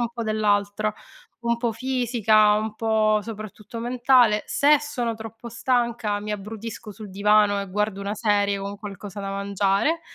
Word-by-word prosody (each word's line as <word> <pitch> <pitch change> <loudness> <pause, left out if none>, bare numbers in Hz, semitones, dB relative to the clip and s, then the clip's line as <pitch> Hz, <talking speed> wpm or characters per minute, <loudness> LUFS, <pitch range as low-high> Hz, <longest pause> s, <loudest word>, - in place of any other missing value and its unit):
un 240 - 0
po' 235 -1 -4
dell'altro, 215 -1 +1 0.5
un 235 0 +1
po' 235 0 -1
fisica, 225 -3 +3
un 215 0 -2
po', 215 -1 +2
soprattutto, 215 0 -8
mentale. 240 -2 +3
Se 295 +1 +4
sono 245 -6 -3
troppo 225 +1 -9
stanca, 235 -3 0
mi 210 +1 -4
abbrutisco 215 +2 -7
sul 210 0 -10
divano 205 +1 +3
e 200 -1 -7
guardo 210 0 -1
una 200 +1 -3
serie 205 -3 +1
con 200 +1 -5
qualcosa 205 -1 -8
da 195 0 -4
mangiare, 200 - 0
215 Hz, 155 wpm, -24 LUFS, 205-235 Hz, 0.5 s, Se